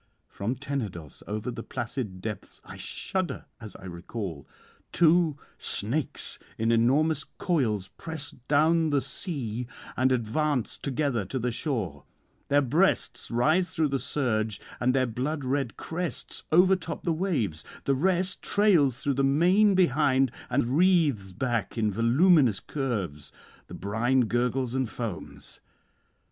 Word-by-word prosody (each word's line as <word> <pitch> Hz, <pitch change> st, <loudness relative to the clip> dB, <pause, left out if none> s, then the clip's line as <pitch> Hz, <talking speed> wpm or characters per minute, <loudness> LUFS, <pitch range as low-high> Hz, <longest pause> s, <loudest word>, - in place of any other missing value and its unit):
from 115 Hz, +6 st, -3 dB
Tenedos, 115 Hz, -, -5 dB
over 110 Hz, +4 st, -3 dB
the 115 Hz, -1 st, -6 dB
placid 115 Hz, -6 st, -4 dB
depths 110 Hz, -2 st, -6 dB
(I -, -, -9 dB
shudder 185 Hz, -8 st, -3 dB
as 110 Hz, -3 st, -9 dB
I 95 Hz, -, -11 dB
recall) 85 Hz, -, -6 dB, 0.4 s
two 165 Hz, -3 st, +4 dB, 0.2 s
snakes 125 Hz, +7 st, 0 dB, 0.2 s
in 115 Hz, +1 st, +1 dB
enormous 140 Hz, +7 st, +3 dB
coils 110 Hz, -, -1 dB
press 160 Hz, -3 st, -5 dB, 0.2 s
down 160 Hz, +2 st, +3 dB
the 145 Hz, -1 st, +3 dB
sea 125 Hz, -, -2 dB, 0.3 s
and 130 Hz, +1 st, +2 dB
advance 130 Hz, +2 st, 0 dB
together 140 Hz, -5 st, -1 dB
to 130 Hz, -, -4 dB
the 125 Hz, 0 st, -1 dB
shore; 110 Hz, -, -3 dB, 0.4 s
their 145 Hz, 0 st, +3 dB
breasts 160 Hz, +9 st, +1 dB
rise 155 Hz, +10 st, +2 dB
through 160 Hz, -3 st, +2 dB
the 135 Hz, 0 st, 0 dB
surge, 110 Hz, -6 st, -1 dB, 0.2 s
and 125 Hz, +1 st, +2 dB
their 130 Hz, -1 st, +3 dB
blood 130 Hz, +5 st, -3 dB
red 135 Hz, -2 st, -1 dB
crests 170 Hz, -4 st, -4 dB
overtop 180 Hz, -1 st, +3 dB
the 170 Hz, -, +1 dB
waves; 145 Hz, -, -1 dB, 0.2 s
the 140 Hz, -, +2 dB
rest 185 Hz, +6 st, +1 dB
trails 170 Hz, -, +3 dB
through 140 Hz, -, +1 dB
the 135 Hz, +1 st, 0 dB
main 180 Hz, +9 st, +4 dB
behind 135 Hz, -6 st, +3 dB, 0.2 s
and 125 Hz, 0 st, +1 dB
wreathes 155 Hz, -, +3 dB
back 115 Hz, 0 st, -2 dB
in 110 Hz, -2 st, +1 dB
voluminous 125 Hz, -, +4 dB
curves; 100 Hz, -, -4 dB, 0.4 s
the -, -, -9 dB
brine 115 Hz, +7 st, +1 dB
gurgles 120 Hz, +2 st, 0 dB
and 130 Hz, -3 st, 0 dB
foams. 115 Hz, -8 st, -7 dB
130 Hz, 130 wpm, -27 LUFS, 115-155 Hz, 0.4 s, two